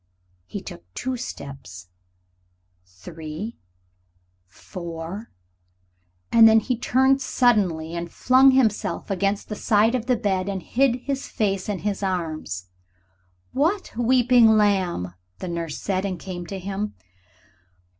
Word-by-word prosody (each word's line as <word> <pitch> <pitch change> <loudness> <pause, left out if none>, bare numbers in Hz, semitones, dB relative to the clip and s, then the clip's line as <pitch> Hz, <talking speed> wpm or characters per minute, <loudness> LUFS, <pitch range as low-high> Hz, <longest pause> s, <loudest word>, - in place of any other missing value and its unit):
He - - -6
took 85 +1 -11
two 260 +1 -2
steps, 135 - -8 0.9
three, 155 - -8 0.9
four 170 - -7 1.0
and 225 -1 +8
then 220 0 +7
he 250 +3 -1
turned 265 +3 +2
suddenly 190 -12 +2
and 170 0 -4
flung 260 +1 +5
himself 235 -5 +1
against 200 +1 0
the 210 - -4
side 215 +2 +3
of 245 -2 -2
the 250 - +3
bed 195 -3 -1
and 195 -2 -4
hid 255 -1 +1
his 275 0 -3
face 195 -2 -1
in 205 - -1
his 205 -1 -1
arms. 160 - -3 0.8
"What, 335 - 0
weeping, 245 0 +5
my 220 - +6
lamb?" 190 - +1 0.2
the - - -6
nurse 170 -3 -4
said, 190 -1 -1
and 190 -3 -3
came 175 0 -7
to 195 - -5
him. 200 +3 -4
200 Hz, 125 wpm, -24 LUFS, 170-235 Hz, 1.0 s, and